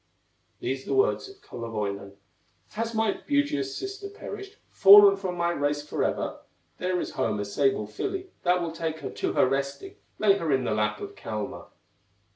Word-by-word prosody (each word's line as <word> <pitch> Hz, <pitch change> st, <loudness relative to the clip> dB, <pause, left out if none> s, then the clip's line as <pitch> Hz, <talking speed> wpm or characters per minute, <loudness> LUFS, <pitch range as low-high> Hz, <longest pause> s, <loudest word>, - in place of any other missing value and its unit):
These 130 Hz, +1 st, -3 dB
the -, -, -1 dB
words 400 Hz, 0 st, +2 dB
of 395 Hz, 0 st, -16 dB
Kullerwoinen: 100 Hz, -4 st, -5 dB, 0.6 s
"Has 230 Hz, +1 st, -3 dB
my 220 Hz, -2 st, 0 dB
beauteous 215 Hz, -, 0 dB
sister 400 Hz, +1 st, -6 dB
perished, 405 Hz, 0 st, -9 dB
Fallen 200 Hz, 0 st, +9 dB
from 190 Hz, -2 st, -4 dB
my 170 Hz, 0 st, +1 dB
race 145 Hz, -1 st, -1 dB
forever, -, -, -1 dB, 0.4 s
There 180 Hz, 0 st, 0 dB
is -, -, -4 dB
home 105 Hz, -, -1 dB
a 105 Hz, -, -2 dB
sable 135 Hz, +2 st, +1 dB
filly 380 Hz, -, -4 dB
That 180 Hz, 0 st, +2 dB
will 165 Hz, -, -3 dB
take 160 Hz, -1 st, -4 dB
her -, -, -5 dB
to -, -, -2 dB
her -, -, +4 dB
resting, 140 Hz, +1 st, -3 dB, 0.2 s
Lay 200 Hz, -2 st, +4 dB
her 165 Hz, -3 st, -1 dB
in 130 Hz, -1 st, +2 dB
the -, -, -1 dB
lap 105 Hz, 0 st, 0 dB
of -, -, -6 dB
Kalma." 105 Hz, -2 st, -5 dB
170 Hz, 170 wpm, -27 LUFS, 130-225 Hz, 0.6 s, Fallen